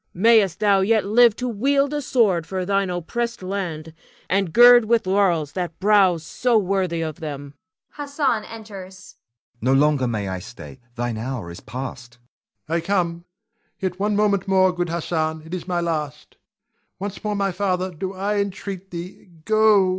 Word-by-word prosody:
Mayst 205 -2 +4
thou 205 -2 +4
yet 215 +2 +2
live 230 +2 +5
to 250 - -3
wield 275 +5 +1
a 295 - -1
sword 205 - +1
for 185 +1 -3
thine 195 0 +1
oppressed 230 +6 -3
land, 170 -5 -4 0.3
and 190 -2 0
gird 240 +1 +8
with 230 -1 +2
laurels 185 -6 +1
that 175 -3 -5
brow 195 -3 +4
so 230 +9 0
worthy 185 -4 0
them. 145 -3 -6 0.4
[Hassan 280 -6 -1
enters. 200 -4 -10
Hassan. 185 - -15 0.5
No 130 +4 +2
longer 140 -1 +3
may 105 -4 -2
I 95 -1 -4
stay: 125 +6 -11 0.2
thine 120 -2 -3
hour 115 -7 -5
is 85 - -9
past. 125 +1 -8 0.5
Ion. 165 +2 0
I - - -5
come, 170 -3 -1 0.5
yet 185 -2 -3
one 205 +1 0
moment 200 -2 +1
more, 185 -1 +3
good 175 -1 -2
Hassan; 160 -2 -2
it 160 - -10
is 185 -1 -5
my 175 -2 0
last. 155 -4 -3
[Exit - - -31
Hassan.] - - -51
Once 200 +1 -6
more, 210 -1 -1
my 200 -1 0
father, 185 0 -1
do 185 +3 -5
I 205 +2 -1
entreat 195 -1 -4
thee, 175 +2 -9 0.2
go. 215 -3 +4
185 Hz, 170 wpm, -22 LUFS, 160-210 Hz, 0.5 s, gird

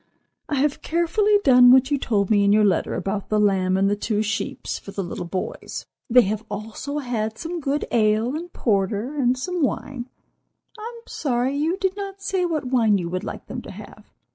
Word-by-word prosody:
"I 295 - 0
have 285 +1 0
carefully 345 +6 +2
done 250 -2 +7
what 260 +2 +5
you 285 - +2
told 205 -5 0
me 205 -2 +4
in 200 - +4
your 210 0 +5
letter 190 -5 +1
about 195 +2 -3
the 215 - +2
lamb 190 -2 +2
and 195 +1 +3
the 205 - +2
two 210 +1 -1
'sheeps' 210 0 -3
for - - -12
the 195 0 -4
little 175 0 -5
boys. 185 +1 -5 0.2
They 245 +1 +7
have 210 +2 -2
also 225 +8 -5
had 225 -5 -2
some 340 +1 -4
good 285 0 -1
ale 220 +3 +2
and 345 +3 -6
porter 210 - 0
and 255 -3 +2
some 360 +6 -3
wine. 260 -2 -2 0.7
I 430 - -12 0.2
am 465 - -15
sorry 255 -1 -1
you 320 +6 0
did 380 -1 -1
not 395 -1 -6
say 385 -2 -1
what 315 -5 -2
wine 230 -5 +3
you 170 -2 -3
would 185 +1 -3
like - - -6
them - - -6
to - - -11
have. - - -12
245 Hz, 205 wpm, -23 LUFS, 205-295 Hz, 0.7 s, done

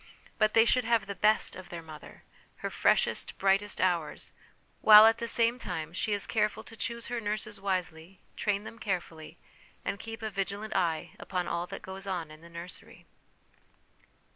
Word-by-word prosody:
But 215 0 +3
they 225 0 +7
should 255 +1 +3
have 230 -3 +2
the 200 - -5
best 215 +2 +2
of 185 -1 -10
their 170 -1 -7
mother, 155 -1 -12 0.4
her - - -2
freshest, - - +1
brightest 195 +1 +1
hours; 175 -4 -1 0.5
while, 215 0 +10
at 225 +1 +4
the 235 - -3
same 230 +1 +2
time, 160 -7 -5
she 210 - -1
is 205 -1 0
careful 215 0 0
to 225 - -11
choose 235 +1 -4
her 240 -1 -3
nurses 210 -1 -3
wisely, 180 -2 -3 0.2
train 205 -1 -1
them 225 +1 -10
carefully, 170 -6 -4 0.5
and 200 - -2
keep 225 +1 -7
a 220 - -3
vigilant 200 +2 -3
eye 165 -2 0
upon 180 -2 -3
all 170 +1 -2
that - - -8
goes 190 +1 -7
on 175 -5 -3
in 155 +1 -13
the 170 - -14
nursery. 170 +2 -10
200 Hz, 175 wpm, -30 LUFS, 175-220 Hz, 0.5 s, while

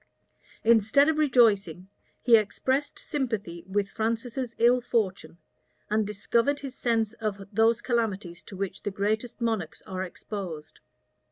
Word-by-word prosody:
Instead 230 +5 +5
of 310 -1 +1
rejoicing, 205 - +3 0.4
he 240 -2 +7
expressed 260 +6 0
sympathy 220 - -3
with 200 +1 0
Francis's 230 +3 -3
ill 245 +2 +4
fortune, 215 -8 -1 0.5
and 215 -1 +2
discovered 235 +7 +1
his 275 -2 -6
sense 225 -4 0
of 215 -4 -3
those 225 +2 +3
calamities 205 -8 -1
to 195 - -11
which 195 -1 -4
the - - -2
greatest 215 +5 -2
monarchs 225 -9 -2
are 185 -1 -4
exposed. 180 -4 -7
220 Hz, 125 wpm, -27 LUFS, 195-240 Hz, 0.5 s, he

